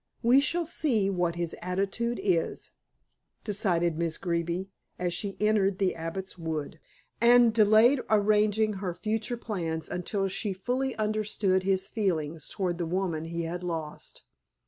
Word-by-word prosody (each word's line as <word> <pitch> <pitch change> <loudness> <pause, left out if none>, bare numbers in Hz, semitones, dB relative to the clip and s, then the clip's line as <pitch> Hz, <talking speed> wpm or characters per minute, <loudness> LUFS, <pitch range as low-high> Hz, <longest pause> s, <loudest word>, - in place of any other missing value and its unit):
"We 245 +4 +6
shall 340 +4 0
see 235 -11 +1
what 175 -2 0
his 170 -1 -3
attitude 195 +6 -1
is," 180 -5 0 0.7
decided 175 -6 0
Miss 165 -1 -1
Greeby, 170 +2 -2 0.3
as 175 -1 -1
she 200 +1 -3
entered 210 -3 +2
the 190 -2 +1
Abbot's 180 +3 -6
Wood, 160 -1 -4 0.4
and 240 -1 +6
delayed 220 +4 +5
arranging 215 0 +3
her 180 -3 -3
future 220 +4 -2
plans 170 -8 -3
until 195 +3 -2
she 195 +1 -2
fully 250 +7 -2
understood 210 -3 0
his 190 0 +1
feelings 165 -7 -2
towards 180 -3 -2
the 170 - -1
woman 170 -3 -1
he 170 +1 -3
had 175 +2 -4
lost. 160 -4 -6
195 Hz, 140 wpm, -28 LUFS, 170-215 Hz, 0.7 s, We